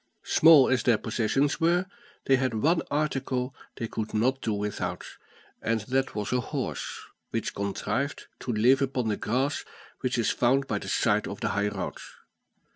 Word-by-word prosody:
Small 155 -4 +7
as 130 -2 +2
their 120 -3 +3
possessions 120 +8 0
were, 175 +2 +3 0.4
they 135 - +4
had 130 -3 0
one 165 +7 +3
article 135 -3 -1 0.2
they 115 - -4
could 110 0 -4
not 130 +5 +1
do 110 - -1
without, 105 0 -3 0.6
and 115 -1 0
that 130 +5 -1
was 105 +2 -2
a 125 - +3
horse, - - -4 0.3
which - - -2
contrived 105 +7 -2
to 125 - -3
live 120 +5 +4
upon 130 -4 0
the 105 - +1
grass 135 +6 -1 0.4
which 130 -1 -1
it 115 - +1
found 130 +5 +2
by - - -2
the - - -7
side - - +2
of - - -6
the - - 0
high 100 +1 0
road. 105 - -4
125 Hz, 170 wpm, -27 LUFS, 110-135 Hz, 0.6 s, Small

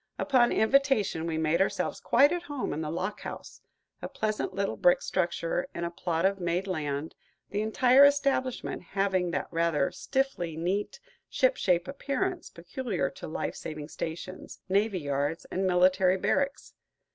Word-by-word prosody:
Upon 255 -4 +3
invitation, 220 - +2
we 160 -1 -2
made 160 +2 +1
ourselves 195 - 0
quite 280 +5 +4
at 350 0 -1
home 290 -6 -4
in 155 - -3
the 155 - -3
lock 180 +5 -3
house, - - -8 0.4
a - - -5
pleasant 215 -2 -2
little 195 +1 -2
brick 175 - +4
structure 170 -1 -1
in 170 - -3
a 170 - -2
plot 170 0 -1
of 195 0 +2
made 175 +1 -1
land, 155 -4 -3 0.4
the 205 - -1
entire 250 +5 +5
establishment 280 -3 +2
having 190 -1 0
that 170 - -2
rather 165 -4 +1
stiffly 265 - -2
neat, 190 - -2 0.3
ship - - +2
shape 180 -1 +1
appearance 335 +6 -3
peculiar 180 - -3
to - - -9
life 155 - -3
saving 155 -1 -7
stations, 170 +4 -6
navy 200 -1 +1
yards, 145 +2 -2
and 190 +1 0
military 185 +1 +4
barracks. 280 +8 -1
185 Hz, 155 wpm, -28 LUFS, 170-245 Hz, 0.4 s, entire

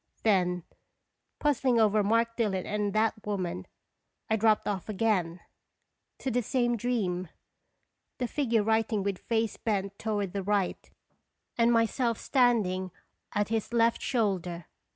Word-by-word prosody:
Then, 180 -5 +2 0.7
puzzling 265 -4 +2
over 215 -1 +4
Mark 230 +3 +1
Dillon 200 -6 0
and 210 -1 -1
that 220 +1 +2
woman, 185 - -3 0.6
I - - +5
dropped 220 0 +2
off 200 -1 -3
again 190 -5 0 0.8
to 265 - -3
the 245 +1 +1
same 240 +1 +1
dream 200 -7 -1 0.9
the 250 - -1
figure 235 -6 +1
writing 220 -1 +1
with 200 -2 -2
face 225 -1 -1
bent 200 -2 -2
toward 205 -4 -2
the 200 - -2
right, 200 -1 -1 0.7
and 235 0 +3
myself 230 0 +2
standing 215 -8 +2 0.4
at 205 0 0
his 225 +1 -2
left 230 0 +3
shoulder. 185 - -1
215 Hz, 130 wpm, -29 LUFS, 195-230 Hz, 0.9 s, I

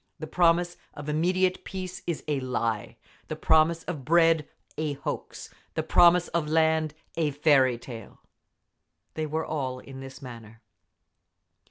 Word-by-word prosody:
The 155 - -6
promise 175 +1 +2 0.2
of 145 0 -7
immediate 180 +4 +1
peace—is 185 -3 -5
a 145 -2 0
lie! 115 -4 -2 0.3
The - - -4
promise 160 +1 +3
of 155 -7 -5
bread—a 160 -1 +1
hoax! 140 - -6 0.2
The - - 0
promise 175 0 +5
of 170 -3 -1
land—a 160 0 +1
fairy 135 -4 +3
tale!… 115 -3 -10 0.9
They 155 -1 -3
were 160 +2 -2
all 130 -4 -3
in 135 +1 -10
this 135 0 -9
manner. 115 -4 -11
155 Hz, 125 wpm, -27 LUFS, 135-170 Hz, 0.9 s, promise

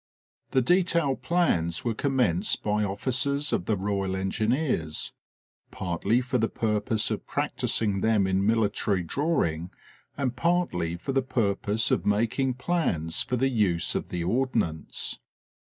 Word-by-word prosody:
The 130 - +2
detail 170 -3 +3
plans 125 - 0
were 115 - +1
commenced 135 - +1
by 105 0 +1
officers 130 +8 0
of 90 - 0
the 105 0 +1
Royal 95 -1 -1
Engineers, 95 - -1 0.6
partly 95 +7 0
for 125 0 -1
the 115 - +2
purpose 110 0 0
of - - -4
practicing 100 -3 0
them 110 -2 +3
in 95 +1 +1
military 105 -3 +1
drawing, 85 - 0 0.5
and 130 -3 -1
partly 145 - 0
for 90 +10 -4
the 135 0 +2
purpose 115 -4 0
of - - +2
making 115 +5 +1
plans 125 - -1
for 125 - -1
the 135 +2 +2
use 100 -9 +1
of - - -3
the 85 -1 -3
Ordnance. 110 - -1
110 Hz, 135 wpm, -27 LUFS, 95-130 Hz, 0.6 s, detail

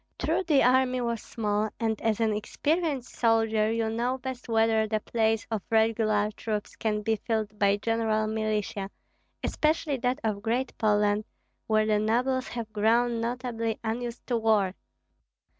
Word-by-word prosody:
True - - 0
the 305 -6 +3
army 255 0 +3
was 235 -2 -2
small, 210 -1 -1
and 220 -2 -1
as 220 -1 +1
an 220 -2 +2
experienced 285 +5 -1
soldier 225 -2 +2
you 225 0 0
know 240 +3 -1
best 260 -1 -7
whether 225 -1 +3
the 215 0 0
place 225 0 0
of 220 -3 -1
regular 220 -2 +2
troops 210 -1 -4
can 210 -2 -1
be 220 +1 +1
filled 215 -2 -3
by 200 0 +3
general 220 0 0
militia, 215 -2 -2 0.5
especially 305 -2 0
that 250 +1 0
of 210 -2 -1
Great 240 +4 -1
Poland, 210 -1 +2 0.4
where 215 -1 +3
the 215 -1 +2
nobles 255 +5 +1
have 230 -3 -6
grown 230 +2 +2
notably 230 -2 -2
unused 235 +1 -4
to 240 - 0
war. 215 -4 +2
225 Hz, 150 wpm, -27 LUFS, 215-240 Hz, 0.5 s, the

